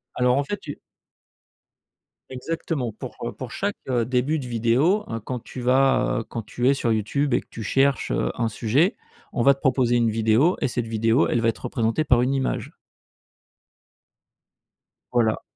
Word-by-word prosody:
Alors 125 +1 +2
en 140 - +2
fait 205 +7 -4
tu 145 -6 -8 1.5
Exactement 130 -1 -3
pour, - - -8
heu, - - -4
pour - - -8
chaque, - - -2
heu, 120 -2 +1
début 130 +5 0
de 130 - -6
vidéo, 125 - +2
hein, 115 -1 -4
quand 125 +1 -4
tu 125 - -10
vas, 130 0 +3
heu, - - -4
quand 115 - -6
tu 125 +4 0
es - - +5
sur 120 -4 -1
YouTube 130 +6 0
et 120 - +2
que - - -28
tu 115 - -8
cherches, 135 +6 +1
heu, - - 0
un 115 - 0
sujet, 125 - +1 0.4
on 125 - 0
va 140 +3 +6
te 135 - -14
proposer 125 -2 +2
une 115 -1 +2
vidéo 115 - +3
et - - +2
cette 120 -1 -3
vidéo, 115 +5 +2
elle 120 - 0
va 115 - +3
être 115 - -4
représentée 120 +3 0
par 120 -4 +4
une 130 +2 +1
image. 135 -1 -2 2.4
Voilà. 115 -3 +1
125 Hz, 180 wpm, -24 LUFS, 115-135 Hz, 2.4 s, va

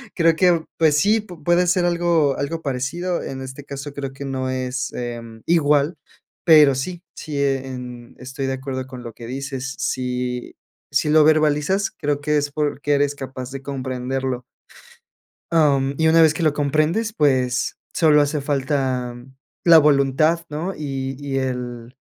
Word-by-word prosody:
creo 165 -2 +4
que 175 -3 +3
pues 155 -3 +4
sí, 210 +8 +3
pue 180 -7 -11
puede 175 +2 +3
ser 180 +1 +2
algo 170 -5 +2
algo 160 +4 -3
parecido 155 +6 -2
en 135 0 -6
este 130 +2 -8
caso, 140 +1 -7
creo 140 -1 -5
que 140 - -8
no 130 -1 -3
es, 130 +1 -3
em, 115 -2 -6
igual, 150 -1 +3 0.5
pero 150 -5 +7
sí, 175 +7 -4 0.2
sí, 150 -2 -5
en 125 -3 -4
estoy 130 +2 -5
de 135 - -1
acuerdo 130 0 -5
con 130 -2 -9
lo 115 - -7
que 115 - -11
dices. 135 +1 -5
Sí 125 -1 -3 0.4
si 150 - +1
lo 155 0 +6
verbalizas, 155 +5 +2
creo 145 0 -2
que 150 0 +1
es 145 0 -1
porque 145 -1 -1
eres 145 0 +1
capaz 130 -2 -7
de 135 0 -6
comprenderlo. 130 -1 -3 1.1
Am, 140 -4 +3
y 160 - +3
una 165 +1 +6
vez 160 -1 +5
que 160 - -3
lo 155 - +4
comprendes, 155 +10 0
pues 130 - +1 0.2
solo 150 -3 +5
hace 145 0 0
falta 135 -3 -1 0.5
la 170 -1 +8
voluntad, 150 +3 +3
¿no? 160 +6 -3
Y 135 -2 -4
y 135 -1 -2
el 125 -2 -4
140 Hz, 160 wpm, -21 LUFS, 130-155 Hz, 1.1 s, la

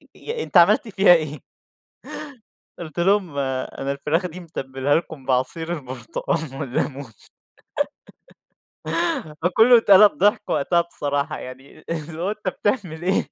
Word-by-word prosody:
ي 460 0 -5
أنت - - +1
عملت 210 +6 +5
فيها 195 -3 +5
إيه؟" 155 -3 -1 1.4
قُلت 170 0 -7
لهم: 185 -5 +1
"أنا 135 0 -3
الفراخ 160 +6 -1
دي 175 +2 -10
متبلها 135 -4 -2
لكم 160 -5 -4
بعصير 135 +6 -1
البرتقان 135 +1 -4
والليمون." 130 -2 -3 2.3
فكُلُّه 225 +7 +6
اتقلب 205 -2 +7
ضحك 205 +2 +2
وقتها 170 +4 +2
بصراحة 145 -4 -3
يعني، 130 +2 -11
اللي 160 0 -5
هو 190 - 0
أنت 210 -3 -3
بتعمل 185 -7 -2
إيه؟ 190 +2 +2
160 Hz, 115 wpm, -22 LUFS, 140-185 Hz, 2.3 s, اتقلب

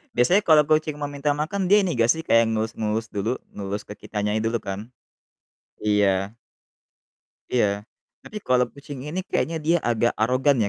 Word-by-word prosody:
Biasanya 180 +12 +4
kalo 155 -5 +5
kucing 155 -1 +1
mau 145 - -3
minta 145 +1 -2
makan 185 +5 -2
dia 205 -1 +5
ini 175 - -1
gak 115 0 +2
sih, 160 +3 +3
kayak 115 0 +4
ngelus-ngelus 110 0 -2
dulu, 110 +5 -1 0.2
ngelus 100 +1 -4
ke 105 - -8
kitanya 105 0 -3
dulu 115 +1 0
kan? 100 +3 -6 0.9
Iya. 100 -1 +1 1.2
Iya, 120 -4 +3 0.6
tapi 215 - -10
kalo 125 -1 +4
kucing 140 -1 -9
ini 175 +5 -3
kayaknya 165 0 0
dia 170 +1 +4
agak 120 0 +2
arogan 130 +4 +3
ya, - - 0
120 Hz, 165 wpm, -24 LUFS, 105-150 Hz, 1.2 s, kalo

